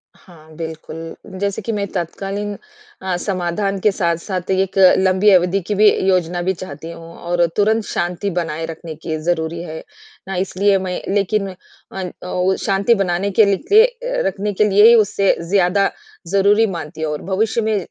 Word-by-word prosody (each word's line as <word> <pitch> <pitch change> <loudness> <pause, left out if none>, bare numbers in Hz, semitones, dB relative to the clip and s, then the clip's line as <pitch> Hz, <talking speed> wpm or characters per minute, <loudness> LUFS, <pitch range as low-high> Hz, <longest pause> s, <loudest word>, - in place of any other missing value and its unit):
हाँ, 160 -3 -18
बिल्कुल 160 0 -7 0.2
जैसे 200 +2 -2
कि 230 - -3
मैं 205 -2 -1
तत्कालीन 195 +4 -3 0.5
अ, 190 -1 -2
समाधान 195 +1 -2
के 210 +2 +3
साथ-साथ 180 +1 -2
एक 190 0 0
अ, 185 -1 +7
लंबी 190 +2 +3
अवधि 180 +1 +3
की 210 - -1
भी 210 +1 +6 0.2
योजना 180 -2 +1
भी 185 +2 0
चाहती 165 -3 -8
हूँ 165 0 -11
और 175 0 +1
तुरंत 215 +2 +2
शांति 175 +3 -2
बनाए 165 -1 -3
रखने 165 0 -8
की 160 0 -4
ज़रूरी 170 -1 -1
है। 160 -2 -7 0.5
अ, 195 - -3
इसलिए 195 +2 +1
मैं 185 -1 -3
लेकिन 200 0 0 0.4
अन 185 -2 -5 0.2
औ 180 +1 +1
शांति 200 +4 +3
बनाने 195 0 -1
के 215 +3 +5
ल 200 -1 +2
लिए - - +3
रखने 205 +1 -2
के 205 - +2
लिए 205 +3 +7
ही 235 - +8
उसे 205 -3 +3
ज़्यादा 195 0 +3 0.4
ज़रूरी 200 +4 +3
मानती 160 -3 -6
हूँ 155 -1 -1
और 150 - -4
भविष्य 215 +5 0
में 220 -1 0
190 Hz, 170 wpm, -19 LUFS, 170-200 Hz, 0.5 s, ही